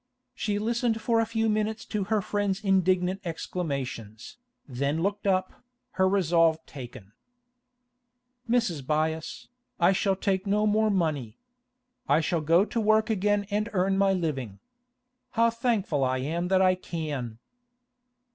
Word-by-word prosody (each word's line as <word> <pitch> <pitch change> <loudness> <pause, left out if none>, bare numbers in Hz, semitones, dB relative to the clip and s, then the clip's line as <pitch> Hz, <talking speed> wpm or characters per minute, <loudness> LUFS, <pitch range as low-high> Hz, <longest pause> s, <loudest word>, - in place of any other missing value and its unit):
She 205 -1 -2
listened 230 +1 0
for 230 +1 +1
a 225 - +1
few 225 0 0
minutes 215 0 -1
to 210 -3 -2
her 210 0 0
friend's 205 0 -1
indignant 185 -1 +2
exclamations, 140 - -5 0.3
then 140 +5 -1
looked 200 +1 -1
up, 185 -1 0 0.3
her 190 -1 +2
resolve 165 -4 +3
taken. 120 -7 -10 1.4
'Mrs. 225 - +1
Byass, 155 +3 -2 0.3
I 175 +1 +5
shall 195 0 +1
take 190 0 -1
no 210 +2 +2
more 215 +1 +2
money. 155 - -1 0.7
I - - +5
shall 165 +1 0
go 165 +6 +4
to 230 - -2
work 215 +1 +3
again 205 0 +1
and 210 +2 0
earn 190 0 +2
my 195 0 +3
living. 140 - -2 0.8
How 230 0 +4
thankful 220 - 0
I 130 0 +1
am 165 +7 -2
that 190 0 +3
I 185 0 +5
can! 150 -10 -5
185 Hz, 135 wpm, -27 LUFS, 155-210 Hz, 1.4 s, I